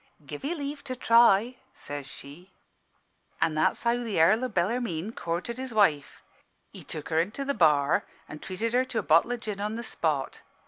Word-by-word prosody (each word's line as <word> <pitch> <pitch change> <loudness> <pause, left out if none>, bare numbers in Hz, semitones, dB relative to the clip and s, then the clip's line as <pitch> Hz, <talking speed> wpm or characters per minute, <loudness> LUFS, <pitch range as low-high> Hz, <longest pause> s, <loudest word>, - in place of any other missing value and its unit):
"'Give - - -8
'ee 310 +5 -2
leave 285 -1 -5
to 255 -2 -4
try,' 235 0 +4
says 145 -1 -8
she. 150 +9 -11 0.9
"An' 160 - +1
that's 155 0 +1
how 235 0 +3
th' 220 -4 -3
Earl 190 +9 +4
o' - - -3
Bellarmine 205 -1 -1
courted 180 +6 -4
his 260 -3 -5
wife. 160 -9 +1 0.5
He - - -10
took 155 -2 -7
her 160 0 +2
into 210 +10 -4
the 280 - 0
bar 150 - +3 0.2
an' 150 - -9
treated 220 +7 -4
her 250 +1 +3
to 260 -3 -6
a - - 0
bottle 165 +10 +4
o' - - -3
gin 210 -3 -6
on 210 +2 -2
the 235 - -5
spot. 155 - -2
210 Hz, 190 wpm, -27 LUFS, 160-240 Hz, 0.9 s, try